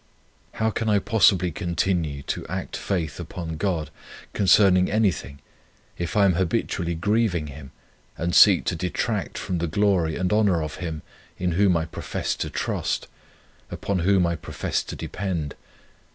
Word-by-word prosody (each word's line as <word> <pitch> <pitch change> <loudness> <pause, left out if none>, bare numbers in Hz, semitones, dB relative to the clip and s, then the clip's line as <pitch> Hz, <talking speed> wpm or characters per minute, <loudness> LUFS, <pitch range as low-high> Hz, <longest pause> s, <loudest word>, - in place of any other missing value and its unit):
How 110 0 0
can 110 +1 -2
I 105 - +4
possibly 95 -4 +3
continue 85 -4 -1
to - - -3
act - - -4
faith 85 -6 -2
upon 85 -2 -6
God, 85 -3 -1 0.4
concerning 95 -1 +5
anything, 95 - 0 0.6
if 85 +3 -3
I 100 - +6
am 95 - +4
habitually 90 -1 -1
grieving 100 -2 +1
Him, 70 -2 -10 0.5
and 85 +1 -2
seek 100 -1 +7
to 90 - 0
detract 90 +1 -2
from 90 -2 -2
the 85 - -1
glory 90 -2 +1
and 90 +2 0
honour 100 -7 +3
of 75 0 -6
Him 80 -4 -5 0.3
in 90 -1 -1
whom 90 0 +3
I 80 - -1
profess 80 - -3
to - - -3
trust, - - -2 0.6
upon 100 -2 -2
whom 95 +1 +3
I 85 0 0
profess - - -3
to - - -6
depend? 85 -7 -3
90 Hz, 150 wpm, -24 LUFS, 80-100 Hz, 0.6 s, seek